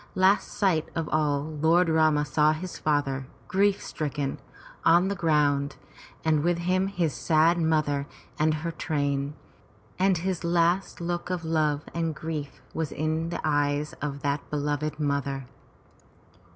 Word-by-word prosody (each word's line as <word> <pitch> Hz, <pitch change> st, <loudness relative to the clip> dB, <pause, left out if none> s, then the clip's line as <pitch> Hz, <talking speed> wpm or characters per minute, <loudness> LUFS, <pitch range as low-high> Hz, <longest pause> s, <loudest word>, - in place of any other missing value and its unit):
Last 190 Hz, +2 st, +4 dB
sight 175 Hz, -6 st, 0 dB
of 165 Hz, -2 st, -1 dB
all, 145 Hz, -2 st, +1 dB
Lord 160 Hz, +3 st, +2 dB
Rama 155 Hz, -2 st, +3 dB
saw 150 Hz, +2 st, +3 dB
his 175 Hz, +3 st, -6 dB
father, 140 Hz, -3 st, 0 dB, 0.2 s
grief 200 Hz, +1 st, +2 dB
stricken, 145 Hz, -2 st, -3 dB, 0.4 s
on 175 Hz, +3 st, +5 dB
the 200 Hz, -, -1 dB
ground, 150 Hz, -4 st, +2 dB, 0.5 s
and 155 Hz, -2 st, +3 dB
with 175 Hz, +2 st, +1 dB
him 185 Hz, +2 st, +1 dB
his 175 Hz, -6 st, -1 dB
sad 165 Hz, +2 st, +3 dB
mother 155 Hz, -3 st, +1 dB, 0.3 s
and 155 Hz, +1 st, +3 dB
her 155 Hz, +2 st, -2 dB
train, 145 Hz, -3 st, -1 dB, 0.6 s
and 190 Hz, -1 st, +3 dB
his 180 Hz, +1 st, -2 dB
last 170 Hz, +2 st, +1 dB
look 175 Hz, +1 st, -3 dB
of 180 Hz, -3 st, -2 dB
love 155 Hz, -2 st, +1 dB
and 165 Hz, -2 st, -1 dB
grief 155 Hz, -3 st, -5 dB
was 160 Hz, -3 st, -2 dB
in 155 Hz, +2 st, -1 dB
the 175 Hz, -, -4 dB
eyes 145 Hz, -1 st, +1 dB
of 140 Hz, -1 st, -3 dB
that 140 Hz, 0 st, -1 dB
beloved 150 Hz, +1 st, -2 dB
mother. 140 Hz, -2 st, -1 dB
155 Hz, 140 wpm, -27 LUFS, 145-170 Hz, 0.6 s, on